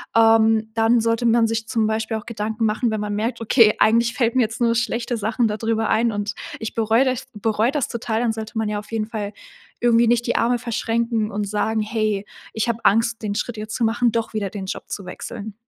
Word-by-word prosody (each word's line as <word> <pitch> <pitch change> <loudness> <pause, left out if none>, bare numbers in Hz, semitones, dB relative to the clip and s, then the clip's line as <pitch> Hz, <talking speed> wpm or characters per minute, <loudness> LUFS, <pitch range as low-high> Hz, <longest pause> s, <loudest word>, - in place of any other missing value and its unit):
ähm, 225 -1 +4
dann 225 +1 +3
sollte 230 +1 0
man 230 0 +4
sich 225 0 -2
zum 225 -3 +1
Beispiel 220 +1 -1
auch 215 - -9
Gedanken 220 0 -2
machen, 220 +2 0
wenn 215 - -1
man 205 0 -3
merkt: 225 +4 -2
„Okay, 225 -1 +5
eigentlich 230 +2 +3
fällt 235 -2 +1
mir 260 - +4
jetzt 225 0 -4
nur 230 -1 +3
schlechte 235 +1 -1
Sachen 220 +2 0
da 210 - -2
drüber 225 0 0
ein 230 +1 +2
und 205 -1 -3 0.3
ich 225 - -5
bereue 225 +3 +3
das 255 -2 -2
bereue 220 +3 0
das 285 -3 -1
total.“, 225 -1 -2
dann 235 -2 +1
sollte 220 +1 -6
man 220 -1 0
ja 210 0 -2
auf 210 - -13
jeden 220 -1 -1
Fall 210 -2 -4 0.5
irgendwie 235 -1 +4
nicht 240 +1 +2
die 240 - 0
Arme 240 +1 +2
verschränken 230 -1 -1
und 205 0 -2
sagen: 220 +2 0
„Hey, 215 -2 -1 0.3
ich 220 +1 -1
habe 230 -1 -1
Angst, 225 +2 +3
den 205 -1 -1
Schritt 240 +2 -3
jetzt 215 +1 -5
zu 235 - +1
machen, 230 +1 +2
doch 230 0 -2
wieder 205 -3 -2
den 195 0 -6
Job - - -5
zu 200 - -5
wechseln.“ 205 +3 -7
225 Hz, 230 wpm, -22 LUFS, 215-235 Hz, 0.5 s, Okay